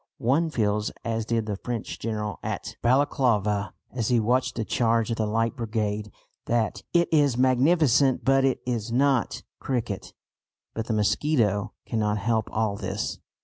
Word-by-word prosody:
One 145 +8 +2
feels 105 -6 0 0.2
as 115 -1 -2
did 115 -2 0
the 105 -2 -3
French 120 +1 -5
general 105 -2 -3
at - - -4
Balaclava, 110 -6 +2 0.2
as 120 -4 -2
he 120 -2 +3
watched 125 +4 +1
the 115 - -2
charge 115 0 +1
of 115 - -1
the 110 - 0
Light 115 +3 0
Brigade, 105 -3 -2 0.4
that 115 -2 0
"it 170 0 +3
is 145 -5 +3
magnificent 130 +1 +3
but 135 0 +4
it 135 -1 +1
is 120 -2 -2
not 130 -1 +1 0.2
'cricket.'" 115 -6 -3 0.6
But 115 0 -4
the 115 - 0
mosquito 105 -1 +1
cannot 105 -2 0
help 110 0 0
all 110 -2 0
this. 95 +1 -3
115 Hz, 150 wpm, -26 LUFS, 105-130 Hz, 0.6 s, but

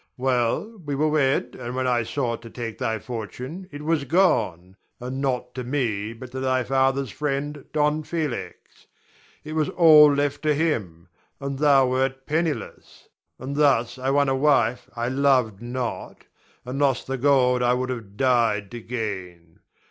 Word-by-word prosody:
Well, 130 - 0
we 145 -2 -3
were 155 +3 +1
wed, 145 -3 +1
and 120 +1 -5
when 130 0 -1
I 125 -2 +2
sought 115 0 -2
to 115 - -10
take 115 -1 -6
thy 115 -3 -1
fortune 125 - -7
it 145 +1 -8
was 160 -2 +1
gone, 95 - +1 0.2
and 130 +2 -5
not 125 -2 -2
to 130 - -5
me, 115 -5 -2
but 125 +2 -10
to 130 - -5
thy 130 -1 +1
father's 135 +1 +1
friend, 145 0 -3
Don 150 0 +1
Felix. 155 -5 -5 0.6
It 155 +1 -7
was 155 -2 0
all 155 -3 +7
left 145 0 0
to 150 -1 +2
him, 100 - -2 0.3
and 140 -1 -4
thou 140 -3 +5
wert 130 +1 -1
penniless; 160 0 -3 0.3
and 135 +3 -6
thus 130 -4 +2
I 130 +1 -1
won 140 +1 +3
a 135 - +1
wife 130 -4 +2
I 120 0 -2
loved 130 -6 +2
not, 120 -1 -5 0.4
and 130 +3 -4
lost 135 -4 +1
the 135 0 -4
gold 125 -2 +3
I 125 0 +3
would 130 0 -2
have 110 -5 -7
died 115 -6 +2
to 120 - -7
gain. 95 -8 -6
130 Hz, 165 wpm, -24 LUFS, 120-145 Hz, 0.6 s, all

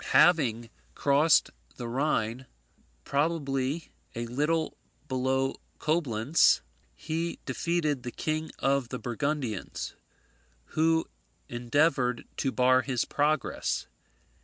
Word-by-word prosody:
Having 120 -10 +4 0.2
crossed 145 +3 +4 0.2
the 120 - -5
Rhine, 125 -1 -1 0.6
probably 145 0 -1 0.2
a 120 +1 -2
little 150 +7 0 0.3
below 130 0 0 0.2
Coblentz, 150 -3 +3 0.3
he 165 - -3
defeated 150 0 0
the 120 - -5
King 155 +5 -2
of 135 -3 +1
the 125 - -3
Burgundians, 125 -3 -3 0.8
who 160 +1 +3 0.4
endeavoured 125 +1 +1
to 135 - 0
bar 130 0 +4
his 130 -3 -1
progress. 150 -1 0
135 Hz, 90 wpm, -29 LUFS, 125-155 Hz, 0.8 s, Having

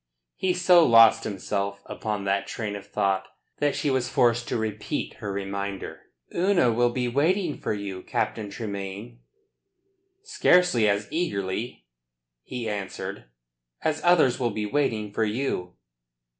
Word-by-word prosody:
He 185 -1 0
so 180 -1 +6
lost 115 -5 +6
himself 100 0 -3
upon 105 -2 -4
that 100 0 0
train 105 -3 -4
of 100 - -9
thought 95 -1 0 0.3
that 145 -1 +1
she 145 - 0
was 130 -2 0
forced 120 -1 +2
to - - -1
repeat 110 -1 -3
her 105 - -5
reminder. 100 0 -5 0.3
"Una 175 -8 +3
will 120 +1 +3
be 125 0 -1
waiting 155 +6 +1
for - - -2
you, 100 -3 -4
Captain 105 +2 -2
Tremayne." 100 +2 -6 1.0
"Scarcely 180 - +3
as 100 +1 0
eagerly," 100 - -3 0.6
he 120 - -5
answered, 100 - -5 0.6
"as 155 0 0
others 165 -8 +4
will 120 -2 +1
be 105 -1 -3
waiting 110 -5 -1
for 110 - +1
you." 105 -5 -2
110 Hz, 135 wpm, -26 LUFS, 100-135 Hz, 1.0 s, so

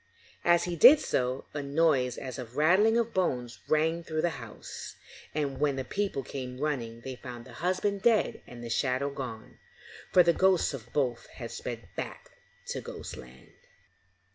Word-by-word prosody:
As 175 0 +5
he 175 -1 -2
did 280 - +9
so, 125 +1 -1
a 145 - -2
noise 140 -3 +2
as 130 -1 -6
of 120 -2 -7
a - - -10
rattling 190 +9 +5
of 235 -1 0
bones 125 -10 -1
rang 160 +2 +2
through 155 -1 -2
the 175 - +2
house, 110 -2 -8 0.4
and 145 -3 -1
when 145 -2 +2
the 135 - -2
people 195 -2 -2
came 125 -1 -6
running, 120 -6 -2
they 130 +1 -6
found 120 -2 -8
the - - -12
husband 190 +3 0
dead 230 -1 +3
and 120 -1 -10
the 120 - -6
shadow 135 +2 +1
gone, 125 -5 -7 0.5
for 180 - +7
the 170 0 +4
ghosts 185 -3 +3
of 120 -3 -8
both 125 -5 0
had - - -8
sped - - -6
back - - -6 0.4
to - - -3
Ghostland. 65 0 -9
140 Hz, 170 wpm, -29 LUFS, 125-170 Hz, 0.5 s, did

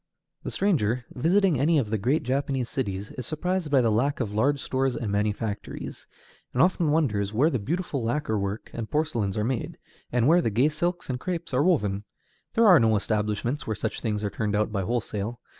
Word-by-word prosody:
The - - -5
stranger 125 - +1
visiting 175 +2 +2
any 155 +4 +3
of 115 -7 0
the 110 - 0
great 140 +10 +1
Japanese 135 -1 -1
cities 100 -6 -3
is 125 - -5
surprised 180 +1 -1
by 140 -2 +4
the 115 -2 +2
lack 135 +7 +1
of 110 -5 -2
large 140 +7 +2
stores 130 -1 0
and 110 -4 -3
manufactories, 105 +1 -3 0.5
and 125 - +2
often 175 -3 +2
wonders 110 -11 +1
where 145 +9 +3
the 130 - 0
beautiful 155 - -2
lacquer 115 -2 0
work 100 +2 -4
and 115 -2 -5
porcelains 115 -11 -1
are 105 - +1
made, 130 +7 -2 0.3
and 120 0 +2
where 170 +3 +5
the 115 - +1
gay 120 +8 +3
silks 175 +3 -2
and 125 -1 -3
crêpes 170 -3 -4
are 125 - +3
woven. 105 - +1 0.5
There 230 - +5
are 180 -7 +8
no 115 -2 +4
large 105 -2 +2
establishments 110 +5 -1
where 110 - -1
such - - -4
things 105 -2 -2
are 105 - -1
turned 105 -2 -1
out 105 +1 +1
by 100 -2 -1
wholesale. 115 +1 -2
125 Hz, 205 wpm, -26 LUFS, 105-150 Hz, 0.5 s, are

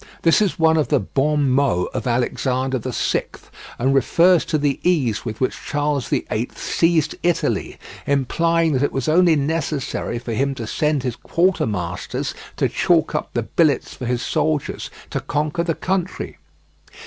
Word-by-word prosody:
This 165 +4 +4
is 200 -4 +1
one 160 -1 +4
of 155 - +2
the 145 - +2
bons 145 +2 +1
mots 130 -9 +1
of - - -3
Alexander 130 +2 0
VI, 125 +1 -1 0.5
and 130 +3 +1
refers 170 +5 +4
to 155 - 0
the 145 -2 0
ease 125 -12 +1
with 110 -2 -5
which 130 - -2
Charles 145 -2 -1
VIII 115 +3 -1
seized 165 -3 +1
Italy, 175 -1 0 0.3
implying 165 +4 +2
that 130 - +1
it 145 - +1
was 135 +1 -2
only 170 +1 +5
necessary 150 -4 -2
for 120 -1 -5
him 135 +4 0
to 115 - -5
send 150 +4 0
his 125 -3 -2
quartermasters 105 - -1 0.2
to - - +2
chalk - - +2
up - - -2
the - - +1
billets 150 -6 +1
for 125 - -6
his 125 0 -1
soldiers 155 -2 -1 0.2
to - - -1
conquer 150 +3 -1
the 165 -2 -1
country. 185 -1 -3
145 Hz, 160 wpm, -21 LUFS, 125-160 Hz, 0.5 s, only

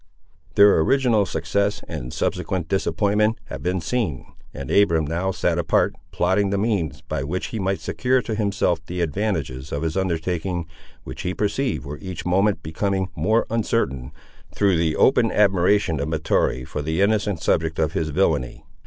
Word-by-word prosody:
Their 100 -3 +7
original 115 - +3
success 100 +5 -1
and - - -6
subsequent 90 +5 -2
disappointment 105 +3 +1
have - - -6
been 90 +1 -1
seen; 85 - -2 0.3
and 70 -1 -7
Abiram 85 -6 +3
now 85 +5 -1
sat 95 - 0
apart, - - +2 0.2
plotting 95 +3 +1
the 100 - 0
means, 95 - -1
by 70 - -4
which 90 +7 -3
he 110 - -2
might 95 0 -1
secure 130 +1 +1
to 110 - -3
himself 100 -6 0
the 90 +2 -4
advantages 80 -7 -2
of 70 +2 -2
his 80 0 -2
undertaking, 90 -1 -1 0.4
which - - -7
he 90 0 -3
perceived 105 - -1
were 75 +1 -7
each 95 -3 -6
moment 95 +3 +2
becoming 95 +4 -1
more 110 +9 +2
uncertain, 85 - -1 0.4
through 100 -3 +2
the 80 -1 +1
open 125 -4 +4
admiration 95 -4 +3
of 70 - -2
Mahtoree 80 -5 0
for 75 - -4
the 80 +3 -2
innocent 100 -2 +1
subject 80 0 0
of 80 -1 0
his 80 - -1
villany. 75 -6 0
95 Hz, 160 wpm, -23 LUFS, 80-100 Hz, 0.4 s, Their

